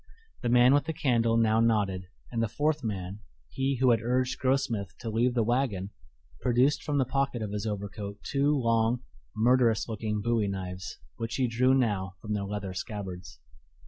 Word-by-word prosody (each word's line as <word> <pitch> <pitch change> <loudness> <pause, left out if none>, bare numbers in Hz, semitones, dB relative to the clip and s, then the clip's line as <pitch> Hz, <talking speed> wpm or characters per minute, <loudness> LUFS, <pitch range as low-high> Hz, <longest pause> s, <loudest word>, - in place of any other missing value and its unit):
The 120 - -1
man 125 +2 +6
with 145 - +3
the 160 - -2
candle 115 -5 +2
now 110 -1 +3
nodded, 100 -5 +1 0.2
and 115 -1 -1
the 115 - +1
fourth 150 +3 0
man 100 -2 -4 0.3
he 135 +1 0
who 130 -1 +5
had 115 -2 +2
urged 125 +2 0
Grossmith 120 -8 0
to 115 -2 -5
leave 120 +3 +1
the 115 - +3
wagon 110 -5 0 0.5
produced 125 +4 +2
from 150 -2 -1
the 135 - +3
pocket 130 -3 -1
of 105 - -4
his 105 +1 -3
overcoat 100 0 -5
two 145 +1 +1
long, 115 +1 +1 0.3
murderous 120 -1 +3
looking 110 -1 -2
bowie 115 -1 +1
knives, 90 -2 -5 0.2
which 115 0 -3
he 130 -2 +1
drew 125 +3 +3
now 100 -7 0
from 105 +1 -4
their 100 -1 -1
leather 100 -2 -4
scabbards. 95 - -6
115 Hz, 175 wpm, -28 LUFS, 100-125 Hz, 0.5 s, man